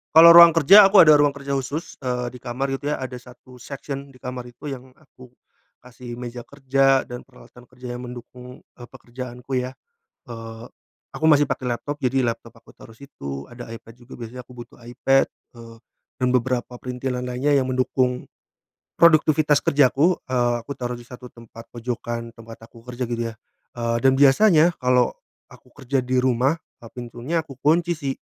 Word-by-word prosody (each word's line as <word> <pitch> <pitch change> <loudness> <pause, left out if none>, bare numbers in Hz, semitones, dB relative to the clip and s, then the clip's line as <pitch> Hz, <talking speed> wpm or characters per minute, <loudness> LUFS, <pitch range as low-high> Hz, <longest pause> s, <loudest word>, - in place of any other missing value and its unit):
Kalau 170 +1 +10
ruang 170 0 +10
kerja 195 +6 +8
aku 195 -4 +7
ada 155 - +7
ruang 145 0 +4
kerja 140 0 -6
khusus, 140 +4 -4
eee, 125 -2 -3
di 125 - -11
kamar 135 +3 -3
itu 140 +2 -4
ya. 150 - -1
Ada 130 -1 -6 0.2
satu 125 0 -17
section 140 +1 -7
di 135 - -18
kamar 125 0 -7
itu 120 +5 -15
yang 130 -2 -7
aku, 130 -4 -18 0.6
kasih 120 -1 -10
meja 120 0 -7
kerja 135 0 +1
dan 125 0 -8
peralatan 125 -1 -18
kerja 125 -1 -9
yang 125 - -7
mendukung, 125 +1 -11 0.2
eee, 120 - -13
pekerjaanku 125 0 -6
ya. 125 - -5 0.6
Eee, 115 -1 -9 0.5
aku - - -6
masih 145 -2 +4
pakai 125 -2 -2
laptop, 145 +5 -5
jadi 130 +1 +1
laptop 120 -2 -3
aku - - -23
taruh - - -15
situ, 70 - -9
ada 120 -1 -10
iPad 115 0 -12
juga 120 +1 -18
biasanya 120 +2 -8
aku 125 - -17
butuh 120 -1 -12
iPad, 135 +3 +2 0.3
eee, 115 -1 -12 0.4
dan 125 - +1
beberapa 125 0 -2
printilan 125 0 -5
lainnya 130 +4 0
yang 135 - +2
mendukung, 125 0 -1 0.7
produktivitas 155 -3 +4
kerjaku, 145 +5 +3
eee, 120 -1 +1
aku 140 +5 -8
taruh 120 -1 -5
di - - -11
satu 125 0 -12
tempat 115 -1 -14
pojokan 120 0 -5
tempat 115 0 -13
aku 115 -1 -18
kerja 120 0 -4
gitu 115 -1 -3
ya. - - -17 0.4
Eee, 115 -1 -2
dan 135 - +6
biasanya 165 +3 +5
kalau 125 -1 +1 0.3
aku 125 - -19
kerja 135 -1 -2
di 130 0 +1
rumah, 130 +5 +1 0.2
eee, 115 - -11
pintunya 125 +6 -4
aku 145 -4 -12
kunci 170 +4 +1
sih. 140 -3 -4
125 Hz, 175 wpm, -22 LUFS, 120-140 Hz, 0.7 s, Kalau